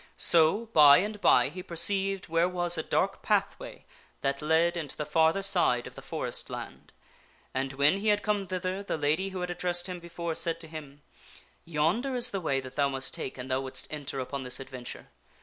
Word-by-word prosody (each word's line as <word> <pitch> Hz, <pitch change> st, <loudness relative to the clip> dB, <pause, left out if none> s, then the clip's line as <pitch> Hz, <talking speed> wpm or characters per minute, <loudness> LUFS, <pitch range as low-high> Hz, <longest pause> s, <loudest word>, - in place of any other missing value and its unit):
So, 170 Hz, +7 st, +4 dB
by 145 Hz, -2 st, +8 dB
and 210 Hz, +2 st, -2 dB
by, -, -, +5 dB
he 180 Hz, +5 st, -8 dB
perceived 195 Hz, +3 st, +2 dB
where 165 Hz, +1 st, +2 dB
was 175 Hz, -1 st, +2 dB
a 160 Hz, -, 0 dB
dark -, -, -1 dB
pathway -, -, -2 dB, 0.4 s
that 140 Hz, +1 st, -1 dB
led 160 Hz, +3 st, +2 dB
into 160 Hz, -4 st, -5 dB
the 150 Hz, -, -3 dB
farther 160 Hz, +5 st, +2 dB
side 150 Hz, -11 st, +3 dB
of -, -, -9 dB
the -, -, -11 dB
forest -, -, -4 dB
land; -, -, -8 dB, 0.6 s
and 135 Hz, +1 st, -2 dB
when 145 Hz, +7 st, +3 dB
he 215 Hz, -, -3 dB
had 210 Hz, -1 st, +2 dB
come 205 Hz, -2 st, -1 dB
thither 185 Hz, +1 st, -3 dB
the 200 Hz, -, -3 dB
lady 155 Hz, +6 st, 0 dB
who 190 Hz, -1 st, -6 dB
had 180 Hz, 0 st, -3 dB
ad 175 Hz, -, -7 dB
dressed 175 Hz, -1 st, 0 dB
him 180 Hz, -1 st, -6 dB
before 170 Hz, -1 st, -5 dB
said 165 Hz, 0 st, -2 dB
to 165 Hz, -, -9 dB
him, 145 Hz, -3 st, -10 dB, 0.3 s
" -, -, -16 dB, 0.3 s
Yonder 170 Hz, -, 0 dB
is 245 Hz, 0 st, +2 dB
the 195 Hz, -, -3 dB
way 140 Hz, -5 st, 0 dB
that 130 Hz, 0 st, -11 dB
thou 140 Hz, -1 st, +2 dB
must 135 Hz, 0 st, -3 dB
take 130 Hz, -, -5 dB
an 125 Hz, 0 st, -7 dB
thou 130 Hz, 0 st, 0 dB
wouldst 135 Hz, +2 st, -5 dB
enter 140 Hz, -2 st, -5 dB
upon 135 Hz, +2 st, -4 dB
this 125 Hz, -1 st, -1 dB
adventure. 130 Hz, -2 st, -8 dB
165 Hz, 210 wpm, -28 LUFS, 140-185 Hz, 0.6 s, by